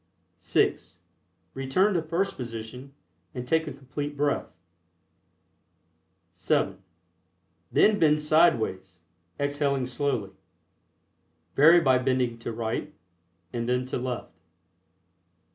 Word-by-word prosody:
(6) - - 0 0.6
Return 135 +10 +1
to 170 - +1
first 170 +5 -1
position 125 +3 -8 0.4
and 125 -1 -5
take 160 +3 +1
a - - -4
Complete 145 +2 -6
Breath. 145 0 0 1.9
(7) - - 0 0.9
Then 210 -1 +4
bend 150 -1 +4
sideways, 115 - +2 0.4
exhaling 140 -2 0
slowly. 125 -5 -2 1.2
(Vary 165 +5 +7
by 130 -4 +4
bending 130 -2 0
to 115 - -5
right 115 0 -3 0.6
and 120 0 -2
then 125 0 +1
to 130 - -3
left.) 125 -1 -5
135 Hz, 95 wpm, -27 LUFS, 120-150 Hz, 1.9 s, Vary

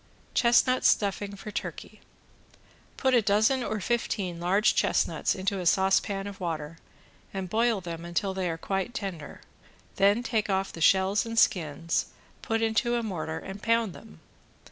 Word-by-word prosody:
~CHESTNUT 255 +1 +3
STUFFING 200 0 +1
FOR 210 +2 -8
TURKEY~ - - -6 1.0
Put 265 -1 +1
a 240 - +5
dozen 220 +5 +2
or 215 - -2
fifteen 195 -5 -2
large 195 +6 +3
chestnuts - - +1
into 195 0 -2
a 180 - -2
saucepan 195 +1 +2
of 200 -1 -8
water, 165 -2 -4 0.6
and 190 -1 -3
boil 225 +1 +1
them 170 -1 -6
until 190 +3 -2
they 190 -2 -2
are 165 - -3
quite 195 +7 -3
tender, 190 -8 -6 0.6
then 205 +4 +3
take 220 -4 -1
off 195 0 -1
the 165 - -8
shells 190 +5 +4
and 230 0 -6
skins, 165 -6 +1 0.3
put 225 -1 -1
into 225 +2 +1
a 235 - -1
mortar 160 -6 -4
and 195 +1 -8
pound 230 -4 +1
them. 80 - -14
195 Hz, 155 wpm, -27 LUFS, 180-225 Hz, 1.0 s, a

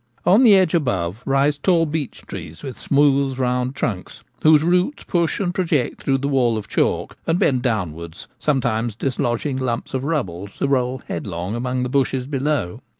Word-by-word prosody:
On 205 +8 +6
the 220 -5 +8
edge 185 -4 +3
above 110 - 0
rise 140 +2 +2
tall 170 0 +3
beech 150 -3 -4
trees 80 +1 -9
with 130 -3 -6
smooth 140 -2 +2
round 125 0 0
trunks, 105 -9 -4 0.2
whose 155 -1 +6
roots 180 - +1
push 170 -2 0
and 180 -3 -1
project 165 -8 0
through 135 -1 +1
the 140 +1 -2
wall 125 -5 +2
of 105 - -6
chalk, - - 0
and 165 - +2
bend 130 -7 +2
downwards, 85 - -3
sometimes 120 -6 0
dislodging 130 +2 -1
lumps 120 -3 -3
of 130 0 -1
rubble 100 - -2
to - - 0
roll 130 -2 0
head 85 - -4
long 90 +2 -4
among 125 +2 -2
the - - -1
bushes 130 -1 0
below. 135 -8 -1
130 Hz, 175 wpm, -21 LUFS, 120-150 Hz, 0.2 s, the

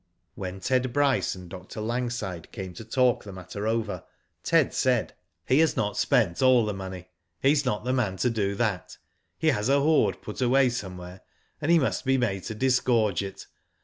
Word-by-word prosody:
When 95 0 -6
Ted 130 +4 +1
Bryce 140 -5 +2
and 90 -1 -10
Dr. 90 +4 -9
Langside 115 -6 -3
came 95 -2 -7
to 85 - -9
talk 125 +2 +2
the 100 - -9
matter 95 +3 -6
over, 110 -5 -1 0.4
Ted - - +2
said: - - +1 0.2
" - - -52
He 130 - +4
has 160 -1 +3
not 105 -1 0
spent 100 -5 +2
all 130 -3 +5
the 105 - -2
money. 95 -2 -7 0.3
He's 145 +1 +3
not 105 -4 -1
the 125 +1 0
man 105 -8 0
to 125 - +1
do 100 -3 -1
that. 105 -5 -2 0.4
He - - +2
has 105 +4 0
a 140 +1 +4
hoard 155 +2 +2
put - - -6
away 130 +1 +4
somewhere, 90 -5 -7 0.4
and 150 - -1
he 170 - +6
must 140 - 0
be 135 0 +2
made 105 -7 0
to 110 - -5
disgorge 120 -5 +2
it. 100 0 -7
110 Hz, 190 wpm, -26 LUFS, 95-130 Hz, 0.4 s, he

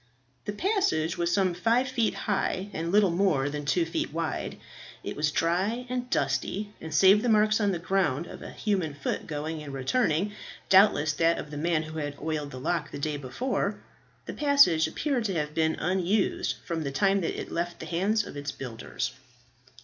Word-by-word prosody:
The 205 - -3
passage 205 - +1
was 170 0 0
some 185 0 +2
five 230 +8 +2
feet 245 -4 0
high, 200 -1 -1
and 165 +2 -2
little 200 -2 +4
more 170 -7 +1
than 145 0 -4
two 165 +3 +2
feet 165 - -2
wide. 165 +1 -3 0.5
It - - -5
was 150 0 +1
dry 185 +10 0
and 250 0 -3
dusty, 140 - -1
and 160 - -7
save 190 +7 +6
the 245 - 0
marks 215 0 +4
on 205 -1 +2
the 180 - -1
ground 170 -4 0
of - - -10
a - - -7
human 185 -9 -1
foot 145 - -3
going 155 +1 -4
and 145 -2 -7
returning, 160 - +1 0.4
doubtless 190 -6 +5
that 165 +3 +2
of 150 - -6
the - - -6
man 165 +1 +1
who 155 0 -6
had 145 -1 -4
oiled 155 -2 -3
the 130 - -8
lock 165 +3 -1
the - - -7
day 150 +1 -2
before, 200 - -2 0.5
the - - -6
passage 280 - +5
appeared 250 - -1
to 195 -3 -1
have 150 -1 -2
been 160 0 +1
unused 185 +4 0
from 170 -2 -2
the 145 - -2
time 195 +7 +2
that 165 - -2
it - - -6
left 175 +1 -3
the - - -6
hands 205 +5 +1
of - - -9
its 145 0 -4
builders. 120 -4 -5
170 Hz, 195 wpm, -28 LUFS, 150-205 Hz, 0.5 s, save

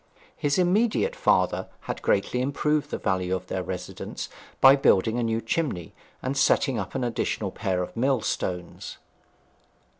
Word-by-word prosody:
His 145 +2 0
immediate 215 - +2
father - - +2
had - - -5
greatly 125 - +1
improved 145 +3 0
the - - -3
value 95 -1 0
of 95 0 -5
their 95 0 -3
residence 90 - -6 0.3
by 135 +1 +8
building 115 -3 +3
a - - 0
new 115 0 0
chimney, 115 - -2 0.3
and 130 +2 -1
setting 135 -2 +2
up - - -5
an 130 - -1
additional 110 -4 -1
pair 95 -4 -1
of - - -8
millstones. 115 -8 -2
120 Hz, 145 wpm, -26 LUFS, 95-145 Hz, 0.3 s, by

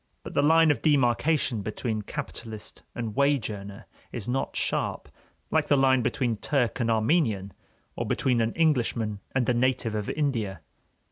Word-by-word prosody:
But - - -8
the - - +3
line 160 +1 +5
of - - -1
demarcation 135 -3 +2
between 110 +1 -3
capitalist 110 +1 -7
and 115 -3 -4
wage 140 -5 +2
earner 100 -1 -8 0.3
is 110 -4 -5
not 130 +2 -2
sharp, - - -1 0.4
like 160 -2 +2
the 145 - +4
line 130 -1 +4
between 120 -1 0
Turk 125 -1 0
and 115 -1 0
Armenian, 110 - +1 0.4
or - - -3
between 125 -3 +1
an 115 0 0
Englishman 120 -9 +1 0.2
and 125 -3 +1
a 125 - +3
native 120 -2 +1
of 105 -1 -3
India. 115 - -1
120 Hz, 155 wpm, -27 LUFS, 110-140 Hz, 0.4 s, line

